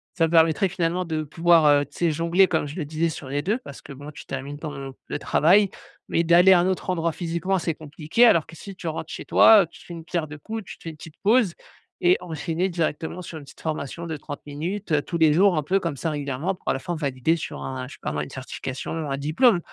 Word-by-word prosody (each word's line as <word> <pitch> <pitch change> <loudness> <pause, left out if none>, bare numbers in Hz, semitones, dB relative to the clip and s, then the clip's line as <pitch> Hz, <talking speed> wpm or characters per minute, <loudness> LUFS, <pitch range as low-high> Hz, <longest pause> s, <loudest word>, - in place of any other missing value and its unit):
ça 165 - +3
me - - -7
permettrait 165 +2 +4
finalement 180 0 -1
de 160 -2 -2
pouvoir, 165 +2 +3
heu, 145 -1 +5
tu 145 - -17
sais, 170 -2 +2
jongler 170 +5 +3
comme 160 -4 0
je 145 - -8
le 160 - -3
disais 160 +3 -1
sur 150 -4 -7
les 145 +2 -1
2 215 +8 0
parce 140 - -11
que - - -9
bon, 145 +2 -9
tu - - -11
termines 135 +2 -5
par 155 -1 -5
exemple 135 -1 -8
le - - -3
travail. 195 +6 +4 0.4
Mais 170 - +1
d'aller 175 +3 +6
à 180 - +5
un 175 - +2
autre 190 0 -2
endroit 170 -2 0
physiquement 175 +3 -1
c'est 165 -2 -2
compliqué 155 +9 +1
alors 170 -9 +4
que, 165 - -12
si 195 +3 -10
tu 180 - -7
rentres 160 0 -4
chez - - -7
toi, 220 -2 +7
heu, - - -7
tu 170 - -17
fais 175 - -9
d'une 165 -1 -9
pierre 170 -2 -2
deux 155 0 -9
coups, 220 +7 -6
tu - - -10
te - - -18
fais 165 - -5
une 155 - -10
petite 155 +1 -12
pause 215 -3 +4 0.5
et 180 +1 +5
enchaîner 170 +1 -2
directement 165 0 -2
sur 170 -2 -8
une 150 - -9
petite 140 - -16
formation 160 +1 -4
de 160 - -3
30 145 0 -7
minutes, 165 +6 -4
heu, 150 - +3
tous 170 - -4
les 160 -2 +5
jours, 185 +1 +4
un 155 - 0
peu 190 +7 +1
comme 165 -5 -3
ça, 160 - -2
régulièrement, 145 +5 -2
pour - - -6
à - - +3
la 135 - -3
fin 175 +5 -4
valider 140 0 0
sur 165 - -6
un 130 -1 -5
je 140 - -11
sais - - -24
pas - - -3
moi, 75 0 -1
une 75 - -8
certification, 130 0 -6 0.2
un 135 - -1
diplôme. 175 - +3
165 Hz, 270 wpm, -24 LUFS, 145-175 Hz, 0.5 s, toi